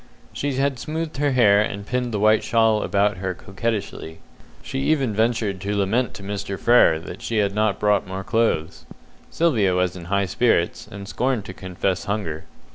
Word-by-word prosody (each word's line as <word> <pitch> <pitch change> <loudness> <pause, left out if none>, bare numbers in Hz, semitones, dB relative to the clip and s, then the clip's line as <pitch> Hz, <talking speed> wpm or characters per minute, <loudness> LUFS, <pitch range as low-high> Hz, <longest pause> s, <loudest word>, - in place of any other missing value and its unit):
She 145 -1 -2
had 135 -1 0
smoothed 160 +2 -4
her 145 -1 +1
hair 105 -5 +5
and 100 -1 -3
pinned 125 +2 -2
the 105 - -2
white 110 +1 +4
shawl 110 -2 +3
about 100 0 +1
her 95 0 -3
coquettishly; 95 -5 -4 0.5
she 135 - -4
even 135 -5 +1
ventured 110 -3 0
to 100 +1 -2
lament 110 +5 0
to 100 - -9
Mr. 100 -1 -4
Frere 120 -9 +5
that 90 +5 -9
she 115 -2 -2
had 100 -2 +1
not 105 -1 +1
brought 105 -2 +2
more 95 +1 -5
clothes. 105 -8 -1 0.4
Sylvia 110 - +2
was 90 0 0
in 85 -2 -9
high 100 +2 +1
spirits, 95 -2 +1
and 100 -1 -9
scorned 125 -1 -1
to 90 - -7
confess 95 0 -3
hunger. 85 -6 -3
105 Hz, 180 wpm, -22 LUFS, 95-120 Hz, 0.5 s, hair